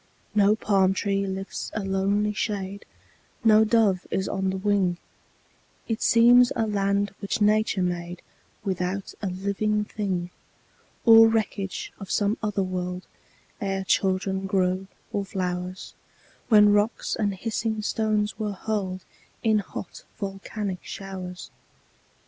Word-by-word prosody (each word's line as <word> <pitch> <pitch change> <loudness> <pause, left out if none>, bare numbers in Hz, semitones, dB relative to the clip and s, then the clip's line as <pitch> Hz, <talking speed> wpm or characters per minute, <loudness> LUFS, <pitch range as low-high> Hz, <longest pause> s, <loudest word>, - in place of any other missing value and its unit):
No 205 0 +4
palm 195 -3 +2
tree 195 0 0
lifts 190 +1 -5
a 215 - -1
lonely 200 +2 +1
shade, 200 -1 -3 0.6
No 220 -1 +6
dove 215 -5 +2
is 190 0 -1
on 190 -1 -1
the 190 - -2
wing; 190 -3 +1 0.9
It 225 -1 -2
seems 240 +1 +6
a 225 - +1
land 200 -1 0
which 200 +1 -2
Nature 210 -2 +2
made 175 0 -3 0.4
Without 190 0 -2
a 205 - -2
living 200 +3 -1
thing, 185 -5 -3 0.7
Or 225 -1 +9
wreckage 210 -4 -2
of 195 -2 -8
some 205 +1 +1
older 210 -2 0
world, 180 0 -4 0.6
Ere 195 -1 -1
children 190 +1 0
grew, 185 0 0 0.3
or 200 - 0
flowers, 185 -1 -4 0.6
When 210 -2 +7
rocks 210 +3 +1
and 205 -3 -1
hissing 220 +1 -2
stones 215 0 0
were 210 -2 -2
hurled 190 -2 -3 0.4
In 220 -2 +3
hot, 190 -2 -8
volcanic 195 -1 -4
showers. 185 -2 -7
200 Hz, 125 wpm, -25 LUFS, 190-210 Hz, 0.9 s, Or